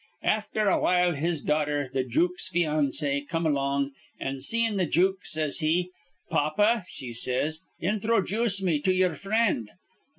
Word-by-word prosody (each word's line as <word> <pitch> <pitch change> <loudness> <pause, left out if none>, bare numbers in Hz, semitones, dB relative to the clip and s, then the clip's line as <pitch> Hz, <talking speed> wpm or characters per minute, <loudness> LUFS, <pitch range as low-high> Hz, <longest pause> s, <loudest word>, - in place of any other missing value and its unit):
Afther 215 0 0
awhile 180 -2 +3
his 160 +1 -2
daughter, 150 -2 0
the 130 -1 +1
jook's 175 +9 0
financee, 150 -4 0
come 165 0 -2
along; 140 -1 0 0.3
an', 135 0 -3
seein' 225 +8 +1
the 185 -3 +1
jook, 185 +4 +2
says 155 0 0
she, 175 +3 +1 0.4
'Pappa,' 205 +8 +2
she 125 -8 -8
says, 130 +7 -1 0.2
'inthrojooce 210 +1 +1
me 165 -5 +1
to 185 +6 +1
ye'er 185 -2 +2
frind.' 200 - 0
165 Hz, 135 wpm, -27 LUFS, 145-195 Hz, 0.4 s, awhile